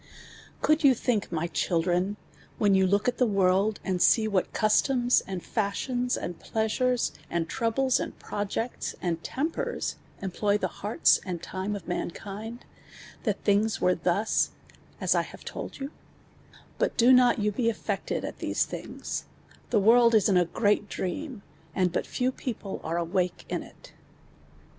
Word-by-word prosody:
Conid 310 +1 +3
yon 270 -3 +7
Ihink, 220 -5 -1
my 165 0 -1
children, 180 +3 0 0.4
when 205 -2 +3
you 190 -1 +4
look 200 +4 +2
at 245 - 0
the 250 - +4
world, 195 +1 +2
and 185 -2 -1
see 220 -2 +5
what 195 -4 0
customs, 245 +3 +3
and 190 -2 -5
fashions, 245 +4 -1
and 175 -1 -5
pleasures, 235 +3 0 0.2
and 170 -1 -1
troubles, 245 +3 +1
and - - -5
|)rojects, 210 +4 -3
and 170 -2 -2
temp<Ms, 325 - -2 0.2
employ 200 +2 0
ihe 210 - 0
hearts 210 +2 +2
and 175 -3 -5
time 190 +2 -3
of 195 -5 -8
mankind, 210 +6 -5 0.6
that 210 -3 -1
thin«;s 210 +1 +2
were 180 - +3
thus, 180 +5 +1 0.5
as - - +2
I - - +3
have - - -11
told - - -6
you/ 275 +1 -5 0.9
IJut - - 0
do 245 +2 +6
not 250 -1 +5
you 210 -1 +1
he 230 +3 +1
alfected - - -3
at - - -7
these - - 0
thin«i,s, - - -5 0.4
the 225 - +3
world 230 +3 +6
is 215 - +5
in 195 - +3
a 175 -2 +4
^reat 205 +2 +1
dream, 235 - -4 0.3
and 180 -2 +2
but - - -2
few 255 +1 0
people 225 -6 -5
arc 165 +2 -2
awake 175 +1 -1
in - - -2
it. - - -15
210 Hz, 155 wpm, -27 LUFS, 185-240 Hz, 0.9 s, yon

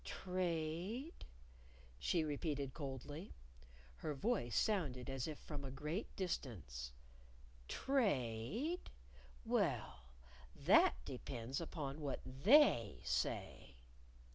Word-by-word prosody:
"Trade?" 180 - -2 0.7
she 170 -3 +2
repeated 145 -2 -1
coldly. 145 - -6 0.6
(Her 150 - -3
voice 165 - +1
sounded 140 - +1
as 135 0 -2
if 155 -2 -4
from 145 -3 -6
a 135 - -4
great 150 - -3
distance.) 100 - -3 0.8
"Trade? 210 - 0 0.6
Well, 65 - 0 0.5
that - - +6
depends 120 +6 -4
upon 155 -3 -4
what 140 -2 -2
They 135 - +5
say." 65 - -1
150 Hz, 90 wpm, -40 LUFS, 130-185 Hz, 0.8 s, that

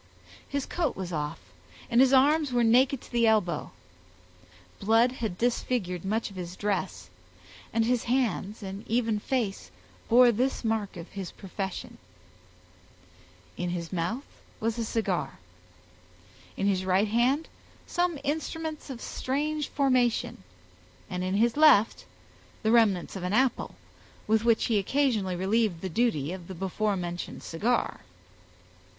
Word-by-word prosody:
His 280 -1 -2
coat 330 -6 -1
was 180 -2 -5
off, 150 -6 -3 0.5
and 235 +2 +4
his 265 -1 +5
arms 285 +2 +4
were 240 -1 +2
naked 250 +3 +4
to - - -15
the 235 -1 +3
elbow; 195 -8 +1 1.1
blood 225 +4 +4
had 225 -8 -4
disfigured 230 -6 -1
much 215 +2 -1
of - - -13
his 180 -1 -6
dress, 205 0 -3 0.6
and 225 0 +2
his 245 0 +1
hands, 230 -4 -1
and 195 +1 -6
even 225 -2 +1
face, 225 -4 -2 0.4
bore 245 +1 +7
this 250 +4 -1
mark 220 -4 -1
of 170 +1 -8
his 195 -3 -6
profession; 195 -1 -6 1.6
in 180 - -2
his 175 0 -4
mouth 185 +11 -2 0.3
was 225 +1 -1
a 230 - -1
cigar; 210 -5 -2 1.2
in 195 - -1
his 190 -2 +1
right 190 +3 +2
hand 250 +8 +2 0.4
some 350 -2 0
instruments 315 +1 -3
of 255 -3 -7
strange 300 +3 -2
formation, 255 - +1 0.7
and 180 0 -2
in 185 +1 -1
his 230 +3 +3
left 290 -8 +5 0.6
the 220 - +2
remnants 210 -7 +3
of 190 - -5
an 180 +2 -2
apple, 260 +3 +1 0.5
with 220 +1 +2
which 230 -1 +3
he 220 -3 +2
occasionally 215 -4 +1
relieved 195 -1 +1
the 190 - -3
duty 170 - 0
of 180 -2 -7
the 190 - -7
before 195 +3 -1
mentioned 175 -1 -5
cigar. 225 +9 -1
225 Hz, 140 wpm, -28 LUFS, 190-250 Hz, 1.6 s, bore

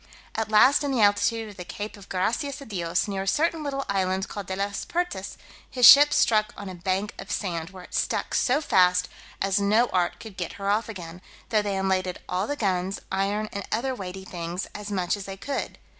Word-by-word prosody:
At 220 -1 -2
last 255 +7 +5
in 285 - -1
the 245 -5 +3
altitude 220 +2 +2
of 205 - -13
the 180 - -6
cape 210 +5 -6
of 200 -1 -15
Gracias 240 +9 -1
a 275 - -10
Dios, 180 -5 -1
near 195 -1 -2
a 195 - -5
certain 325 - +1
little 275 -2 -3
island 190 -1 0
called 200 -3 -7
De 190 - -3
las 200 +1 -2
Pertas, 335 - -3 0.3
his 250 -2 +3
ship 290 +1 +10
struck 215 -2 +3
on 205 - -7
a 185 - -6
bank 190 +3 -2
of 195 - -8
sand, 170 -4 -2
where 185 -2 -11
it - - -15
stuck - - -1
so 270 +4 +2
fast, 180 -8 +3 0.3
as 195 +1 +1
no 215 +4 +3
art 180 -1 +1
could 220 -4 -11
get 175 -2 -4
her 200 0 -2
off 220 +3 0
again, 180 -4 -8 0.3
though 215 -2 +3
they 200 -1 -2
unladed 185 -1 0
all 185 +3 -1
the 290 - -2
guns, 190 -5 -1
iron, 200 +3 0
and 200 0 -4
other 260 +4 0
weighty 190 -4 -7
things 175 +1 -4
as 210 0 -7
much 185 -2 0
as 200 -2 -7
they 195 0 -7
could. 275 +7 -4
200 Hz, 220 wpm, -26 LUFS, 185-225 Hz, 0.3 s, ship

